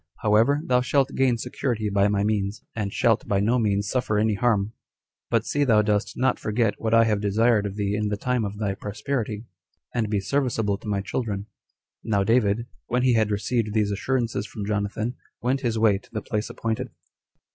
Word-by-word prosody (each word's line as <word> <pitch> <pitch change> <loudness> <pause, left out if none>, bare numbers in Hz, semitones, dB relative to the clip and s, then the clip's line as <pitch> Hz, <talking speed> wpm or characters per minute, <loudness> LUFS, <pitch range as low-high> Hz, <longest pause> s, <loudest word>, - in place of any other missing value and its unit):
However, 115 +7 +4
thou 125 -1 +3
shalt 135 +1 +1
gain 130 -3 +2
security 115 -1 -2
by 100 0 +3
my 100 -1 +1
means, 105 0 -1
and 105 -3 -2
shalt 115 +1 +2
by 100 - +1
no 115 +5 +2
means 100 -2 +1
suffer 110 -1 0
any 110 +1 +2
harm; 105 -1 +1 0.6
but 115 -1 +1
see 145 - +1
thou 110 -6 +4
dost 105 -1 0
not 130 0 +1
forget 110 0 +1
what 110 - -1
I 115 0 +6
have 105 -3 +1
desired 105 +1 +2
of 100 - -6
thee 100 -1 -1
in 105 0 0
the 105 0 -1
time 125 +2 0
of 100 0 -4
thy 105 -2 -1
prosperity, 105 +2 -4 0.5
and 115 -3 0
be 105 -1 +1
serviceable 110 -3 0
to - - -11
my 100 -1 0
children." 100 -2 -3 0.6
Now 100 -3 +1
David, 115 0 +2 0.2
when 125 +1 0
he 130 -1 +4
had 110 -2 +2
received 105 +1 -1
these 105 -2 +2
assurances 115 0 -1
from 100 0 -6
Jonathan, 105 +3 -2 0.2
went 130 +3 0
his 115 -3 -1
way 110 -3 +3
to - - -23
the 110 -2 -4
place 105 0 -2
appointed. 115 +3 -3
110 Hz, 195 wpm, -25 LUFS, 105-120 Hz, 0.6 s, I